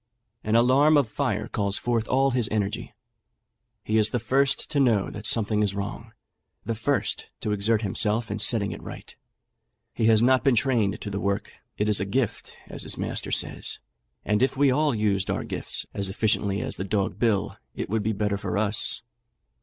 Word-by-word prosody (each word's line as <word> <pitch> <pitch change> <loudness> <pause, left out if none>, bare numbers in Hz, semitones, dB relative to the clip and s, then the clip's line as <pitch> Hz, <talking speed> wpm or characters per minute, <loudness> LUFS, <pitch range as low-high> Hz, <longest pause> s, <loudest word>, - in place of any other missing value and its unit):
An 110 +1 0
alarm 135 +6 +5
of 140 -5 +2
fire 105 +1 -2
calls 100 -3 -1
forth 115 -2 -1
all 135 +1 +2
his 120 -4 0
energy. 110 +3 -3 0.9
He 110 +1 +1
is 105 0 +3
the 125 - -1
first 135 +5 +1
to 145 - +1
know 115 -7 +2
that 105 - -5
something 105 -2 +2
is 100 -2 0
wrong 105 +3 -6 0.5
the 115 - -1
first 120 +5 -1
to 105 - -2
exert 105 +2 +1
himself 105 +2 +1
in 105 - -3
setting 105 -1 +3
it - - -7
right. - - -10 0.8
He 110 - +1
has 110 0 +5
not 130 +1 +4
been 135 -3 +4
trained 115 -4 +1
to 105 - -5
the 100 - -3
work 100 0 -2 0.2
'it 105 - 0
is 105 -3 +3
a 95 - -1
gift,' 115 +4 -2
as - - -6
his - - -2
master - - -3
says; - - 0 0.5
and 105 +1 +1
if 135 +1 +1
we 140 -1 +4
all 145 0 +1
used 100 -3 0
our - - -1
gifts - - -2
as 100 -1 -2
efficiently 100 0 0
as - - -4
the - - -3
dog 95 0 -2
Bill, 110 -5 0 0.2
it - - -4
would 110 +2 -1
be 110 +2 0
the 105 - -5
better 105 -1 0
for 100 - -3
us. 105 +1 0
110 Hz, 195 wpm, -25 LUFS, 100-120 Hz, 0.9 s, alarm